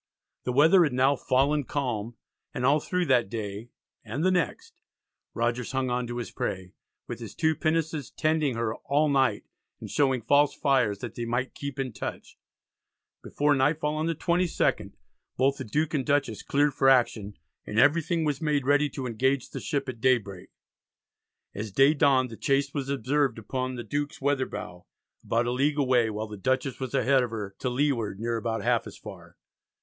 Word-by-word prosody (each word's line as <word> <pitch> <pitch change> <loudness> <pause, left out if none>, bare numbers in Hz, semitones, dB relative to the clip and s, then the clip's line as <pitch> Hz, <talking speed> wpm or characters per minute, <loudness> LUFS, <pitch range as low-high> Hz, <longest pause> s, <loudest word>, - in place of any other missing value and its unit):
The 125 - 0
weather 160 +8 +6
had 150 -5 0
now 130 +3 +3
"fallen 140 +3 +1
calm," 120 -5 -3 0.4
and 125 - -1
all 145 +3 +4
through 180 +3 -1
that 125 - +2
day 105 +1 -5 0.3
and 115 +8 -4
the 185 - +4
next 185 - -2 0.5
Rogers 120 +2 -1
hung 130 -1 0
on 125 0 -1
to 120 0 -5
his 120 - -5
prey, 95 -1 -4 0.3
with - - -6
his - - -9
two 160 0 +2
pinnaces 155 -2 -1
tending 155 -4 0
her 115 -1 -1
"all 150 +2 +1
night," 130 -6 +2 0.4
and - - -8
showing 135 -5 +1
"false 145 +4 +3
fires" 130 -7 +2
that - - -6
they 120 - -4
might 120 +3 -2
keep 140 -1 -6
in 130 -3 -3
touch. - - -7 0.9
Before 145 0 +1
nightfall 150 +2 +1
on 155 +1 -1
the 165 - -1
22nd, 175 +2 0 0.4
both 135 +2 +2
the 130 - -5
Duke 150 +7 -1
and 140 -3 0
Dutchess 140 -7 0
cleared 145 0 +1
for 135 +1 +3
action, 110 -6 +2 0.3
and 105 - -4
everything 160 +5 +3
was 145 -1 -1
made 150 -4 0
ready 145 +1 +3
to 130 -1 -6
engage 130 +3 0
the - - -5
ship 140 -1 -2
at 120 -3 -6
daybreak. 110 -8 0 1.0
As 105 +1 -5
day 135 +8 +5
dawned 135 -4 +3
the 115 - -9
chase 140 0 0
was 140 -2 -3
observed 140 -1 0
upon 130 +3 -3
the 120 - -5
Duke's 145 +7 -3
weather 135 -1 0
bow, 95 -4 -8 0.4
about 115 +1 0
a 120 - -1
league 140 +4 +1
away, 125 -5 +3
while 110 0 -4
the 105 -1 -9
Dutchess 130 +4 -1
was 130 -2 -4
ahead 135 0 +3
of 125 - -2
her 105 -3 -6
"to 130 - -1
leeward 125 -6 -1
near 115 +1 -1
about 115 0 -3
half - - +1
as - - -10
far." - - -12
130 Hz, 185 wpm, -27 LUFS, 120-145 Hz, 1.0 s, weather